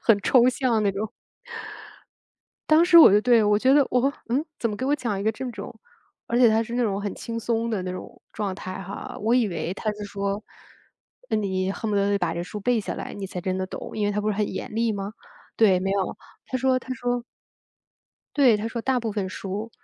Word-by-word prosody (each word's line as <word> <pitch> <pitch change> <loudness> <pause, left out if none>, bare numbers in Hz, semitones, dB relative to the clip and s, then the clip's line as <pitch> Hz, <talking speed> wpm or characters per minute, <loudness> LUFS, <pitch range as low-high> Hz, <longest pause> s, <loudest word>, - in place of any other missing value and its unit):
很 225 -3 +5
抽 250 -1 +5
象 245 -3 +1
那 200 - +2
种。 210 +2 -3 1.6
当 310 +2 +6
时 345 -1 +7
我 315 - +10
就 205 - +6
对 235 -2 +5
我 205 0 +4
觉 260 +5 +4
得 285 -2 +5
我 255 +3 +2 0.2
嗯？ 270 +6 +1 0.2
怎 230 - 0
么 210 - -3
给 260 - -3
我 290 - +2
讲 230 -8 -2
一 200 - -3
个 220 - +2
这 250 +3 -5
种？ - - -8 0.5
而 235 - 0
且 245 -2 +7
他 220 +1 +2
是 235 +1 -6
那 245 - +2
种 200 -3 -1
很 205 -1 -3
轻 230 0 -6
松 230 0 -1
的 215 -5 -1
那 180 - -3
种 185 - -9
状 200 -3 -3
态 185 0 -6
哈， 195 +2 -7
我 230 +3 +3
以 240 -4 +3
为 170 +1 -3
他 215 +1 -2
在 210 0 -8
说， 200 +1 -3 0.9
嗯， 215 - +1
你 190 -1 -1
恨 220 +2 -4
不 - - +1
得 200 0 +2
把 175 -3 -1
这 170 - -3
书 180 +4 -7
背 240 +2 +1
下 - - -4
来 - - -6
你 195 -1 -5
才 180 -1 -6
真 185 +1 -2
的 185 - -1
懂， - - -7
因 210 - +1
为 205 - +1
他 210 +1 -1
不 215 - 0
是 200 - -4
很 210 - +1
严 - - -6
厉 230 0 +1
吗？ 200 +1 -4 0.5
对， 195 -5 +5
没 195 +1 -1
有， 195 -2 -1 0.3
他 260 - -2
说 255 0 +2
他 255 - -5
说 245 0 -2 1.1
对， 260 -6 +6
他 210 +2 -3
说 230 0 -4
大 260 0 +1
部 225 -2 -3
分 200 -2 -2
书， 200 +4 -5
215 Hz, 255 characters per minute, -25 LUFS, 200-240 Hz, 1.6 s, 我